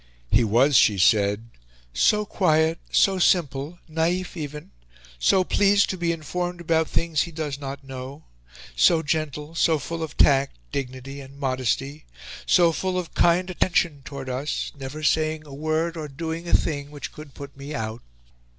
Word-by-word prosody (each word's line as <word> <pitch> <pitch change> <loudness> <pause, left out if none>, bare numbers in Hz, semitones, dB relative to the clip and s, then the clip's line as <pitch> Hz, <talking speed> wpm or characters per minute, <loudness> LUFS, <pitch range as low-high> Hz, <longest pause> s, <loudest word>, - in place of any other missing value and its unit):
He 115 +3 +5
was, 120 +6 +3
she 105 -3 +5
said, 105 +3 +2 0.4
"so 210 - +3
quiet, 160 -4 +2
so 195 -1 +3
simple, 160 -3 +1
naif 170 +4 -1
even, 150 - -7 0.5
so 185 - +4
pleased 200 +2 +3
to - - -3
be 170 -1 0
informed 175 +2 -3
about 160 -1 +1
things 165 -3 0
he 170 - -3
does 150 -3 -4
not 140 -1 -6
know, 135 +3 -8 0.5
so 160 - +4
gentle, 150 0 -2
so 160 -1 +3
full 165 +4 -5
of 160 - -5
tact, 135 - +4
dignity, 135 +1 -5
and 135 +1 -13
modesty, 135 +2 -2 0.4
so 175 -2 +5
full 185 +3 -2
of 180 -2 -4
kind 180 +2 +3
attention 175 -5 +1
towards 135 -2 -6
us, 135 +4 -3
never 140 +2 -7
saying 155 0 +1
a 145 - -11
word, 155 +3 -1
or 155 -2 -5
doing 160 +4 -5
a - - -3
thing, 145 -2 -1
which 145 -1 -7
could 150 -2 -12
put 140 0 -9
me 140 +2 -7
out... 110 -2 -4
150 Hz, 160 wpm, -24 LUFS, 135-165 Hz, 0.5 s, He